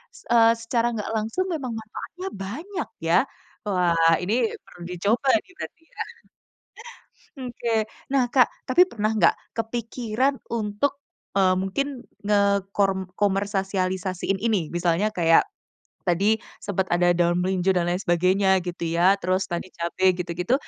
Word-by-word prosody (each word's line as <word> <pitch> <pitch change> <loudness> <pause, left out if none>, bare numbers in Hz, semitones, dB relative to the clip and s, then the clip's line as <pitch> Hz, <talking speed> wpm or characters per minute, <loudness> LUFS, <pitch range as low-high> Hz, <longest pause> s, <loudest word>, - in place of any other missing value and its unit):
s - - -15
eee, 230 -1 +6
secara 230 +1 -1
nggak 210 +1 -4
langsung 225 +11 -1
memang 270 -7 -3
manfaatnya 225 - -7
banyak 275 - -5 0.2
ya. - - +4 0.5
Wah 170 -3 +3
ini, 200 +5 0 0.3
perlu 175 - -16
dicoba 205 +9 0
nih - - -22
berarti 325 - -8
ya. - - -18 1.4
Oke. 235 -3 -1 0.2
Nah 270 -2 +3
Kak, 255 -3 +6 0.2
tapi 360 +8 +4
pernah 215 - -1
enggak, 185 -6 +4 0.2
kepikiran 235 +3 -1
untuk, 225 +5 -1 0.4
eee, 185 -1 +5
mungkin 250 +8 -2 0.2
ngekor 200 -1 +2
komersialisasiin 190 -2 -1
ini, 210 -9 0
misalnya 175 +5 +1
kayak 165 - +4 0.6
tadi, 200 +5 +3 0.2
sempet 190 -1 -1
ada 175 0 +4
daun 175 0 +2
melinjo 190 0 +1
dan 175 -1 +1
lain 175 - +1
sebagainya 185 +1 +3
gitu 175 -1 -5
ya. 185 +4 +4
Terus 185 +2 +1
tadi 175 +2 -4
cabe 185 +2 +1
gitu-gitu, 180 +4 -2
200 Hz, 130 wpm, -24 LUFS, 180-230 Hz, 1.4 s, eee